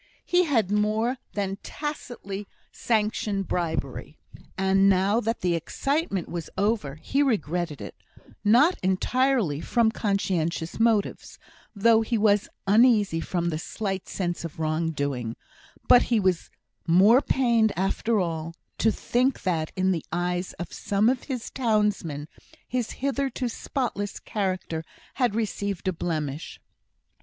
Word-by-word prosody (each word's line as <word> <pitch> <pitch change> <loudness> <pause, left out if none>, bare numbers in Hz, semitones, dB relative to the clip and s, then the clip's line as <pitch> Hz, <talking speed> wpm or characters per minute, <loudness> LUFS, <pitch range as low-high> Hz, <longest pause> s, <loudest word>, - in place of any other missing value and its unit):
He 360 0 +3
had 225 - +1
more 215 +4 +1 0.2
than 195 -1 -2
tacitly 245 -9 -6 0.2
sanctioned 210 -3 0
bribery; 170 -3 -3 0.4
and 190 +1 +4
now 195 +3 +3
that 230 0 -2
the 180 -1 +1
excitement 200 - -1
was 170 -2 -5
over, 200 -9 0
he 210 - -1
regretted 175 - 0
it; - - -7 0.5
not 250 - +5
entirely 195 - +1
from 230 +2 +2
conscientious 180 -6 -1
motives, 225 -3 +1 0.4
though 225 +2 +5
he 225 +1 0
was 210 -1 +3 0.2
uneasy 210 -4 +4
from 170 0 -1
a 155 - -2
slight 195 +1 -4
sense 175 -3 -2
of 165 -3 -7
wrong 160 +1 0
doing; 135 -7 -2 0.5
but 245 - +8
he 235 -3 +1
was 185 -4 0 0.4
more 200 +10 +6
pained, 235 -6 +2
after 205 +4 +1
all, 165 -2 -3 0.2
to 225 - +4
think 250 +5 0
that, 165 -4 -1
in 185 0 +2
the 165 -4 -1
eyes 175 +1 -1
of 175 - -7
some 205 +3 +1
of 255 0 -1
his 255 -5 -4
townsmen, 210 - 0 0.4
his 245 -2 -2 0.2
hitherto 270 -2 -1
spotless 230 -4 -3
character 185 -5 -3 0.4
had 240 -5 +2
received 200 -4 -2
a 185 - +2
blemish. 155 -3 -4
200 Hz, 130 wpm, -26 LUFS, 175-230 Hz, 0.5 s, but